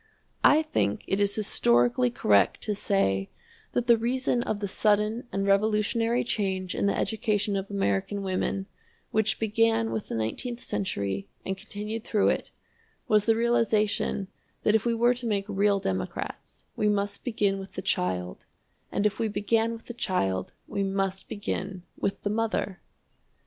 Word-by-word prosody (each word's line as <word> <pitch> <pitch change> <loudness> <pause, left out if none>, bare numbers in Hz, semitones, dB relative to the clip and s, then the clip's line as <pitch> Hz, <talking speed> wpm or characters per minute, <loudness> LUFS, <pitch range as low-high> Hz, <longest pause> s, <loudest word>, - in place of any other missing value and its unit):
I 305 +2 +6
think 105 - 0
it 195 +1 0
is 200 0 +2
historically 120 - +3
correct 100 -4 +3
to 210 - 0
say 95 - +1 0.4
that 245 - +1
the 235 -2 +5
reason 245 +1 +1
of 215 -3 -2
the 205 - -2
sudden 210 +4 +1
and 195 0 -1
revolutionary 215 +4 +2
change 190 -4 -1
in - - 0
the - - +1
education 210 -1 0
of 195 0 -3
American 195 - -1
women, 190 0 -1 0.5
which 215 -3 +1
began 225 +1 +2
with 220 - -3
the - - -4
nineteenth 235 - -3
century 100 - -2 0.2
and 190 - -1
continued 210 +2 -6
through 210 -3 +2
it, - - -1 0.6
was 210 -1 +4
the 225 - +4
realization 220 -4 +1 0.4
that 210 - +3
if 220 0 +2
we 235 - +2
were 240 +2 +4
to 245 -1 -4
make 200 -3 0
real 200 0 +2
democrats, 95 - -4
we 210 - +2
must 200 -1 -1
begin 205 -5 +1
with 195 0 -9
the - - -5
child, 90 0 -1 0.4
and 205 - 0
if 210 -1 +1
we 225 - +1
began 225 +2 +1
with 230 0 -8
the 240 - -7
child, 95 - -1
we 200 - -3
must 195 -1 -1
begin 195 -2 -4
with 195 - -2
the 205 - 0
mother! 215 -3 -1
205 Hz, 160 wpm, -27 LUFS, 190-225 Hz, 0.6 s, I